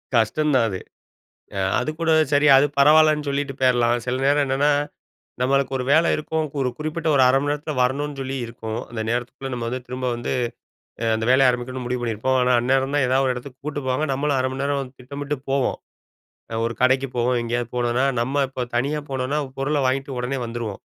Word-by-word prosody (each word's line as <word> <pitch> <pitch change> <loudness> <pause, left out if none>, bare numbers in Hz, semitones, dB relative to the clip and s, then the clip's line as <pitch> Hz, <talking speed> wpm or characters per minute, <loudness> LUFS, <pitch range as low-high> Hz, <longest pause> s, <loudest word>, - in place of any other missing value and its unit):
கஷ்டம் 135 +7 +2
தான் 120 -3 +4
அது. 95 -2 -4 0.8
அ - - -2 0.2
அதுக்கூட 160 +2 -2 0.2
சரி 145 +1 +4
அது 135 +2 +5
பரவாயில்லன்னு 150 +1 +5
சொல்லிட்டு 140 0 -1
போயிர்லாம். 120 -2 +3
சில 125 0 0
நேரம் 145 +1 +3
என்னன்னா, 135 +2 +2 0.7
நம்மளுக்கு 135 +1 +1
ஒரு 125 - -3
வேலை 160 +3 +5
இருக்கும். 155 +1 -2 0.2
ஒரு 130 - +1
குறிப்பிட்ட 155 +2 -3
1/2 130 0 +5
மணி 145 0 0
நேரத்தில 150 +1 -3
வரணுன்னு 140 +3 -1
சொல்லி 135 0 -4
இருக்கும். 110 -1 -6
அந்த 115 -1 -4
நேரத்துக்குள்ள 120 +3 -3
நம்ம 120 -1 -3
வந்து 130 +1 -4
திரும்ப 130 +1 -4
வந்து 120 - -4 0.7
அ - - 0
அந்த 110 0 -2
வேலைய 130 +1 +5
ஆரம்பிக்கணும்னு 125 +1 -5
முடிவு 125 0 -2
பண்ணியிருப்போம். 120 +3 0
ஆனா, 125 0 +2
அந்நேரம் 135 +2 +1
தான் 145 -3 +3
எதாவது 130 +2 +2
ஒரு 130 - +1
இடத்துக்கு 125 +1 -9
கூட்டு 145 -1 -3
போவாங்க, 130 +4 0
நம்மளும் 140 +1 0
1/2 130 - +1
மணி 135 +1 -4
நேரம் 140 -2 -2
திட்டமிட்டு 145 +3 -4
போவோம். 135 -1 +1 0.8
அ - - -3
ஒரு 120 - -3
கடைக்கு 130 +1 +3
போவோம். 120 +1 +1
எங்கேயாவது 120 0 -2
போனோன்னா, 120 +1 +1 0.2
நம்ம 135 +4 0
இப்போ 130 -1 -5
தனியா 140 +5 0
போனோனா 135 +2 -1 0.2
பொருள 145 +3 0
வாங்கிட்டு 135 +1 -1
உடனே 125 +2 -2
வந்துருவோம். 115 -4 -5
130 Hz, 185 wpm, -22 LUFS, 125-145 Hz, 0.8 s, அது